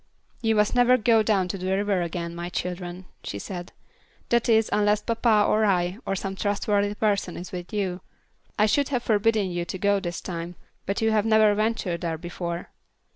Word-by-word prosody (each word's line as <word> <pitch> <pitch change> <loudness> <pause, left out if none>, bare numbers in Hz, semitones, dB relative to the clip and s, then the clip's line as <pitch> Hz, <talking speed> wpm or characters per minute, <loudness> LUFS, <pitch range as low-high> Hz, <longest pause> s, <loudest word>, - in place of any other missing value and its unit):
"You 225 -1 +2
must 210 0 +2
never 245 0 +5
go 225 -1 +4
down 205 -4 +1
to 195 - -3
the 185 +1 0
river 200 -2 +1
again, 170 0 -4
my 170 +1 -5
children," 180 0 -5 0.2
she 100 - -5
said; 175 - -7 0.6
"that 235 0 +2
is, 225 -1 +4
unless 210 0 +2
papa 225 -2 +3
or 220 - +2
I, 185 -1 +1
or 195 - 0
some 195 0 -4
trustworthy 205 0 0
person 200 -4 0
is 180 - -8
with 180 -1 -7
you. 190 -4 -2 0.6
I 210 - +4
should 280 +6 +2
have 250 -4 -1
forbidden 215 -2 +2
you 175 0 -2
to 190 - -5
go 200 +1 +2
this 175 -3 -4
time, 170 0 -6 0.3
but 200 +3 -1
you 220 - +3
have 215 0 +2
never 220 -1 +5
ventured 215 -5 -1
there 165 -2 -2
before." 170 0 -5
200 Hz, 190 wpm, -25 LUFS, 180-215 Hz, 0.6 s, never